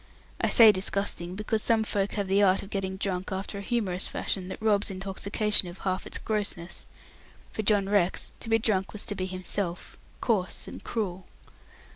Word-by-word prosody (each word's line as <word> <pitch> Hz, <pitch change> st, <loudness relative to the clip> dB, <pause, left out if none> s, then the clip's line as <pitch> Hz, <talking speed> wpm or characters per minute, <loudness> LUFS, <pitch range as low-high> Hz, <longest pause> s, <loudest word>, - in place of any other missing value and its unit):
I -, -, +2 dB
say 225 Hz, -2 st, +9 dB
disgusting, 185 Hz, -2 st, -1 dB
because 215 Hz, +2 st, -1 dB
some 225 Hz, 0 st, +3 dB
folks 200 Hz, -2 st, -1 dB
have 200 Hz, -2 st, -1 dB
the 195 Hz, +2 st, +3 dB
art 190 Hz, -1 st, +4 dB
of 200 Hz, -, -12 dB
getting 190 Hz, -1 st, -2 dB
drunk 190 Hz, -1 st, -2 dB
after 195 Hz, +1 st, -3 dB
a -, -, -5 dB
humorous 200 Hz, -5 st, -1 dB
fashion, 185 Hz, -2 st, -2 dB
that 185 Hz, -, -6 dB
robs 215 Hz, -1 st, +2 dB
intoxication 195 Hz, +1 st, +1 dB
of 175 Hz, +1 st, -8 dB
half 185 Hz, -1 st, -2 dB
its -, -, -1 dB
grossness. 200 Hz, -5 st, -3 dB, 0.6 s
For -, -, -2 dB
John 205 Hz, -2 st, +3 dB
Rex 195 Hz, -3 st, +1 dB
to -, -, -5 dB
be 225 Hz, -, +5 dB
drunk 205 Hz, -4 st, 0 dB
was 210 Hz, -, -4 dB
to -, -, -3 dB
be 185 Hz, -2 st, -3 dB
himself 185 Hz, -1 st, -3 dB, 0.2 s
coarse 200 Hz, -6 st, 0 dB
and -, -, -9 dB
cruel. 190 Hz, -5 st, -3 dB
195 Hz, 180 wpm, -28 LUFS, 185-210 Hz, 0.6 s, say